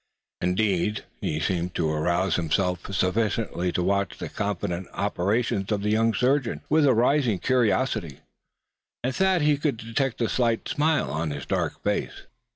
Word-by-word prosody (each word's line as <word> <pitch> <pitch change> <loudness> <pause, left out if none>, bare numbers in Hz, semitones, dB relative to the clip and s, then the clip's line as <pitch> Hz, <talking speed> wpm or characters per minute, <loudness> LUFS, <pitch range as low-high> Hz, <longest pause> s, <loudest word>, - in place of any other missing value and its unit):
Indeed, 95 +2 +1
he 75 - -2
seemed 90 0 -1
to 80 - +1
arouse 85 +4 +1
himself 90 +2 -1
sufficiently 95 -1 0
to 90 - -1
watch 100 0 0
the - - -5
confident 90 -3 -3
operations 100 +1 0
of 100 -1 0
the 105 - +1
young 115 +1 +3
surgeon 125 +1 +1
with 155 -1 +4
a 130 - +5
rising 125 -2 +3
curiosity; 115 - 0 0.8
and 130 +1 -1
Thad 190 -2 +3
thought - - +1
he 150 -1 +4
could 145 -5 0
detect 115 +3 -2
a 115 - +2
slight 115 -2 0
smile 155 +2 +1
on 80 +1 -2
his 70 -1 -5
dark - - -2
face. - - -2
105 Hz, 160 wpm, -25 LUFS, 90-125 Hz, 0.8 s, a